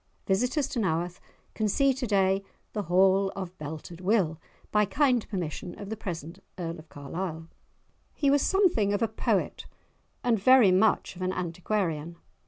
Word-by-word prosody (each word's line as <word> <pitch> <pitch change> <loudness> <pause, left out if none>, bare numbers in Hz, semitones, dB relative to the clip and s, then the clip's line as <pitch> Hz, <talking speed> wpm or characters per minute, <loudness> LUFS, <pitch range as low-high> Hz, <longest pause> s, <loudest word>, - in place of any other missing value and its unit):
Visitors 250 +8 +1
to 260 - -2
Naworth 175 -3 -1 0.3
can 215 - 0
see 275 +6 +3
to 255 -1 -4
day 195 -1 +2 0.3
the 210 - -1
"hall 190 +2 +4
of 185 -2 -6
Belted 160 +3 -7
Will," 185 -5 +1 0.3
by 210 0 +4
kind 250 +1 +1
permission 175 -2 -4
of 200 0 -7
the - - -1
present 170 -3 -6 0.2
Earl 170 -2 -4
of 155 0 -14
Carlisle. 160 +3 -5 0.7
He 280 -2 +2
was 285 0 +4
something 355 - +3
of 205 - +1
a - - +3
poet 220 - -1 0.6
and 235 -4 +2
very 245 -2 +6
much 190 +1 +2
of 180 - -10
an 185 0 0
antiquarian. 170 -2 -2
195 Hz, 160 wpm, -28 LUFS, 170-220 Hz, 0.7 s, very